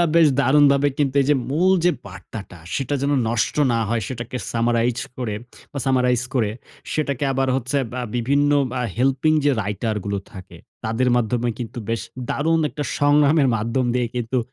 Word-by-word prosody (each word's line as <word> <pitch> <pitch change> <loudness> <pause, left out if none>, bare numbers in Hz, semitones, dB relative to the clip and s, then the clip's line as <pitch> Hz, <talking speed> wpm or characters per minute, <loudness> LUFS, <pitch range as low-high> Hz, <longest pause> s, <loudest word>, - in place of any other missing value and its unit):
বেশ 165 -2 +7
দারুণভাবে 140 +1 +4
কিন্তু, 140 -2 +1
এই 135 - -2
যে 150 - +5 0.2
মূল 175 +6 +3
যে 180 - +5 0.2
বার্তাটা 100 -6 -9 0.2
সেটা 135 +1 -1
যেন 140 - +1 0.2
নষ্ট 115 +4 0 0.2
না 115 - +1
হয়, 115 0 0
সেটাকে 120 -1 -5 0.2
সামারাইজ 120 +1 +1 0.2
করে 120 -5 -3 0.4
বা 140 - -4
সামারাইজ 125 -2 +2
করে, 110 -5 +1 0.4
সেটাকে 140 -3 -1
আবার 135 0 0
হচ্ছে 135 +2 -1
বা 125 - -3 0.2
বিভিন্ন 140 +4 +2 0.2
বা 125 - -2 0.2
হেল্পিং 135 +5 +2
যে 145 - +4
রাইটার 105 +2 -2
গুলো 100 0 -2
থাকে, 95 -2 -11 0.3
তাদের 115 +3 +1
মাধ্যমে 120 +1 0
কিন্তু 120 -1 -6
বেশ 115 -3 -1 0.3
দারুণ 160 +3 +1
একটা 145 - -4
সংগ্রামের 145 0 +4
মাধ্যম 115 +4 -1
দিয়ে 125 -1 +1
কিন্তু, 120 +2 -1
125 Hz, 165 wpm, -22 LUFS, 115-145 Hz, 0.4 s, বেশ